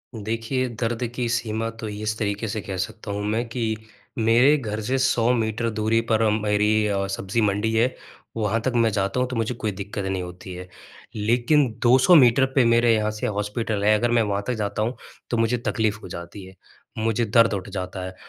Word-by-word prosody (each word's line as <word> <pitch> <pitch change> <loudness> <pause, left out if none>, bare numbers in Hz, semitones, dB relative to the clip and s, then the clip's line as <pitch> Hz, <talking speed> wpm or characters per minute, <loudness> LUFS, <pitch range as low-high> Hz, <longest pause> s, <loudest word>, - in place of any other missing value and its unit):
देखिए 115 +4 -2
दर्द 115 +1 -1
की 125 -2 -1
सीमा 115 -1 -1
तो 110 - -4
इस 105 +1 -3
तरीके 105 0 -2
से 105 0 -3
कह 95 -1 -6
सकता 110 +2 -5
हूँ 105 0 -3
मैं 115 +2 0
कि 115 -2 -1 0.4
मेरे 120 +6 +5
घर 110 -4 -4
से 130 +5 -1
100 125 -2 +2
मीटर 115 0 -1
दूरी 110 +1 +1
पर 110 0 +3
मेरी 105 0 +2
अ, 100 -1 -1
सब्जी 100 +3 -2
मंडी 105 +2 +1
है, 120 +3 +2 0.4
वहाँ 110 +1 0
तक 130 - 0
मैं 115 -1 +4
जाता 100 +4 -1
हूँ 125 - +1
तो 130 - -4
मुझे 115 +2 -1
कोई 110 -3 -2
दिक्कत 100 +1 -5
नहीं 95 -1 -2
होती 90 +1 -9
है। 90 0 -8 0.5
लेकिन 120 +7 +2 0.2
200 130 +9 +6
मीटर 130 -1 +6
पे 130 -4 +5
मेरे 115 0 +4
यहाँ 110 0 0
से 105 - -3
हॉस्पिटल 105 0 -2
है, 105 +1 +5
अगर 120 +2 0
मैं 120 -1 +4
वहाँ 100 -1 -1
तक 125 - 0
जाता 105 -1 -2
हूँ। 120 +4 -1 0.3
तो 120 - -1
मुझे 115 +2 +2
तकलीफ़ 110 -2 0
हो - - -7
जाती 85 +3 -8
है, 95 - -14 0.4
मुझे 115 +1 0
दर्द 115 +1 +4
उठ 100 0 -4
जाता 95 -1 -5
है 95 0 -8
110 Hz, 205 wpm, -23 LUFS, 105-115 Hz, 0.5 s, 200